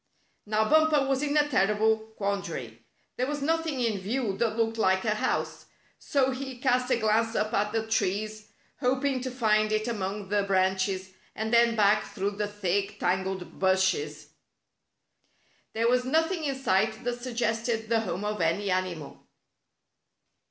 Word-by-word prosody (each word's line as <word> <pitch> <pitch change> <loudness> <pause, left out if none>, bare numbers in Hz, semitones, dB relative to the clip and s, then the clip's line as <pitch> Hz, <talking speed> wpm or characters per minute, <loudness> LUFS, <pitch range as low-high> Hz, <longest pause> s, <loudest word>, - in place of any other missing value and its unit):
Now 215 +1 +1
Bumper 310 -1 +4
was 270 0 +1
in 295 0 0
a 295 0 +4
terrible 220 -3 +3 0.2
quandary. 200 -1 -4 0.3
There 255 - 0
was 290 -1 -3
nothing 325 -2 0
in 225 -4 0
view 215 +1 -2
that 225 -2 0
looked 225 0 0
like 190 -1 +2
a 215 - +2
house. 215 - -2 0.3
So 265 -2 +1
he 260 0 -5
cast 250 0 +1
a 250 - +3
glance 225 +1 +1
up 215 0 0
at 210 +1 +1
the 220 0 -1
trees, 215 0 -1 0.3
hop 260 +1 0
ing 270 -2 0
to 260 - -3
find 215 -4 +2
it 215 +1 0
among 205 -3 -3
the 205 0 +2
branches, 190 0 0 0.2
and 220 +1 -3
then 235 0 +5
back 210 0 +3
through 200 0 -1
the 205 +1 -3
thick, 205 0 -2
tangled 190 0 -2
bushes. 185 -6 +1 1.4
There 230 +1 +1
was 250 +1 +3
nothing 320 +5 0
in 275 -2 -1
sight 220 -4 0
that 245 0 -3
suggested 230 -2 -1
the 230 0 +2
home 205 -2 -3
of 210 -2 -2
any 185 +5 +1
animal. 180 -5 -3
220 Hz, 160 wpm, -28 LUFS, 200-250 Hz, 1.4 s, then